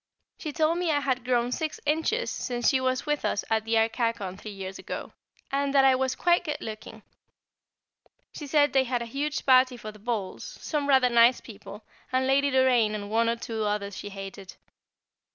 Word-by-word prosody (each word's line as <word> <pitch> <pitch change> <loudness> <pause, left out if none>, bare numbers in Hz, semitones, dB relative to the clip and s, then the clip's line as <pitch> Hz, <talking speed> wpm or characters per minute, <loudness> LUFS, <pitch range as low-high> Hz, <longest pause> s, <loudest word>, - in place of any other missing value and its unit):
She 310 - -4
told 320 +3 +1
me 355 -2 0
I 295 -2 +2
had 260 -3 -1
grown 245 -1 +1
six 310 +4 -3
inches 320 +11 0
since 240 -2 -2
she 260 -2 +1
was 255 0 0
with 295 -1 -1
us 200 - -1
at 220 0 +1
Arcachon 225 -3 0
three 210 +2 -9
years 195 -1 -7
ago, - - -7 0.4
and 280 0 0
that 270 -1 +6
I 265 - +6
was 260 0 0
quite 350 0 +2
good 305 -3 -3
looking. 215 -1 -8 1.3
She 295 - -7
said 290 0 +3
they 265 -1 +3
had 245 -1 -1
a 235 +2 -11
huge 295 +2 -2
party 255 -1 +5
for 215 -2 -8
the 215 - -16
balls, 210 -3 -4
some 290 -2 -2
rather 260 -2 +5
nice 235 +1 +5
people, 210 -1 -11 0.3
and 260 0 +1
Lady 275 +1 +3
Doraine 250 -5 +3
and 205 0 -6
one 230 +1 +2
or 230 - +1
two 225 -1 -4
others 205 -1 -2
she 205 - -7
hated. 195 -1 -9
250 Hz, 190 wpm, -27 LUFS, 220-280 Hz, 1.3 s, that